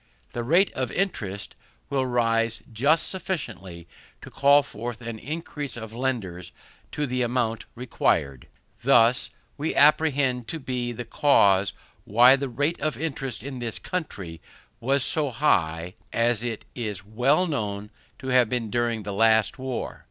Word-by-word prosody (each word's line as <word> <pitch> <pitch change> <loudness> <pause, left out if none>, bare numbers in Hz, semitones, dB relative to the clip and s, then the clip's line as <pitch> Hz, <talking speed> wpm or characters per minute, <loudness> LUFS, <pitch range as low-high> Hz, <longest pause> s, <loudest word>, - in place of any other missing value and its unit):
The 120 - -3
rate 170 +10 +3
of 130 -2 -2
interest 105 - -3 0.4
will 135 -2 +1
rise 115 -2 +1
just 145 +8 +3
sufficiently 95 - -5 0.4
to - - -10
call 140 +1 +5
forth 120 -4 -6
an 115 -2 -6
increase 145 -2 -5
of 110 -1 -8
lenders 110 -9 -3 0.4
to 150 - -1
the 125 -1 -2
amount 115 -2 -1
required. 70 - -1 0.3
This 120 -1 +4 0.3
we 155 +3 -1
apprehend 140 -5 +3
to 165 - -4
be 125 -3 -3
the 120 +1 -6
cause 100 -7 +3 0.3
why 120 +5 +6
the 135 0 -3
rate 145 +8 -1
of 155 -1 -1
interest 135 -6 -4
in 135 -2 -6
this 115 -3 -3
country 95 - -5 0.4
was 135 +2 +1
so 150 -3 +2
high 90 - +1 0.2
as 115 -1 +1
it 120 -3 -4
is 105 -6 -3
well 125 - +2
known 105 - -3 0.3
to 130 - -6
have 125 -3 +4
been 115 -3 -2
during 120 -2 0
the 100 0 -5
last 110 +3 +3
war. 130 -2 -4
120 Hz, 145 wpm, -25 LUFS, 110-140 Hz, 0.4 s, why